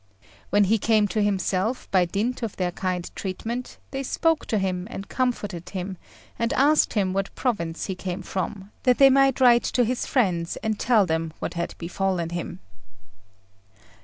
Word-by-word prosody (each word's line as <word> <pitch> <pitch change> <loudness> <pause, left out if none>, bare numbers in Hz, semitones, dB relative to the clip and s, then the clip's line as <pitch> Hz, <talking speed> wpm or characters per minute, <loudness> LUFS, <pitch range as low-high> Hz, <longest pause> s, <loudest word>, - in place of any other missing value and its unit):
When 205 +2 +4
he 215 +3 +2
came 215 -1 +3
to 210 +4 0
himself 200 +3 0
by 185 -2 +4
dint 215 +9 -2
of 230 -4 -3
their 180 -1 -1
kind 180 -1 -2
treatment, 230 +6 -4
they 270 - -3
spoke 325 +4 0
to 220 - +1
him 185 -1 -1
and 200 -4 -7
comforted 205 -9 -2
him, 190 0 -4 0.4
and 230 0 +1
asked 295 +3 +4
him 195 -4 +1
what 195 0 -2
province 170 -11 -2
he 190 - -3
came 180 0 -5
from, 195 +2 -4
that 250 -2 +3
they 275 -1 +7
might 275 -1 +4
write 240 -2 +6
to 245 - +1
his 250 +2 -2
friends 180 -10 +1
and 220 -1 -1
tell 225 -5 +4
them 160 -1 -1
what - - -4
had 170 0 -3
befallen 175 0 -1
him. 175 +1 -5
200 Hz, 170 wpm, -25 LUFS, 180-240 Hz, 0.4 s, they